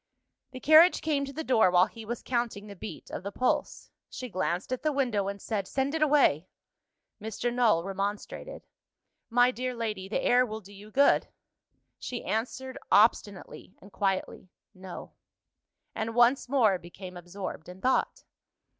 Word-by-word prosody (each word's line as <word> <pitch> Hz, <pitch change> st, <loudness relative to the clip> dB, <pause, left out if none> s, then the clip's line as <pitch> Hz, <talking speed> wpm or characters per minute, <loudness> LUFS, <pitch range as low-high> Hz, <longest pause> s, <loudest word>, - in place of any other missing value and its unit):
The 255 Hz, -, -9 dB
carriage 315 Hz, +6 st, +6 dB
came 290 Hz, -3 st, 0 dB
to 275 Hz, -, -8 dB
the 320 Hz, +3 st, -5 dB
door 225 Hz, -9 st, +4 dB
while 180 Hz, 0 st, +5 dB
he 225 Hz, +1 st, -11 dB
was 240 Hz, +3 st, -5 dB
counting 235 Hz, -4 st, -2 dB
the 205 Hz, -1 st, -10 dB
beat 205 Hz, -, -9 dB
of -, -, -5 dB
the 200 Hz, +2 st, -6 dB
pulse. 250 Hz, +5 st, -1 dB, 0.2 s
She 255 Hz, -, -7 dB
glanced 185 Hz, +3 st, -2 dB
at 255 Hz, -, -3 dB
the 305 Hz, -, +1 dB
window, 240 Hz, -8 st, 0 dB
and 200 Hz, 0 st, -4 dB
said, 200 Hz, -2 st, -3 dB
"Send 270 Hz, +2 st, -1 dB
it 320 Hz, -, -2 dB
away." 275 Hz, -, +3 dB, 0.7 s
Mr. 225 Hz, +3 st, -3 dB
Null 225 Hz, -9 st, +3 dB
remonstrated. 200 Hz, -, -5 dB, 0.6 s
"My 245 Hz, +1 st, +4 dB
dear 255 Hz, 0 st, -4 dB
lady, 210 Hz, -5 st, -4 dB
the -, -, -1 dB
air 250 Hz, +1 st, +4 dB
will 220 Hz, -3 st, -5 dB
do 205 Hz, -1 st, -15 dB
you 205 Hz, +2 st, -13 dB
good." 280 Hz, +6 st, +3 dB, 0.7 s
She 245 Hz, -, -5 dB
answered 255 Hz, +4 st, -3 dB
obstinately 200 Hz, -2 st, +1 dB
and 200 Hz, -, -16 dB
quietly, 190 Hz, -1 st, -2 dB, 0.2 s
"No" 185 Hz, -1 st, -9 dB, 0.8 s
and 225 Hz, +1 st, -4 dB
once 245 Hz, +2 st, +4 dB
more 220 Hz, -9 st, +3 dB
became 180 Hz, +2 st, -10 dB
absorbed 175 Hz, -1 st, -7 dB
in 180 Hz, +1 st, -11 dB
thought. 260 Hz, +6 st, 0 dB
220 Hz, 160 wpm, -28 LUFS, 195-255 Hz, 0.8 s, carriage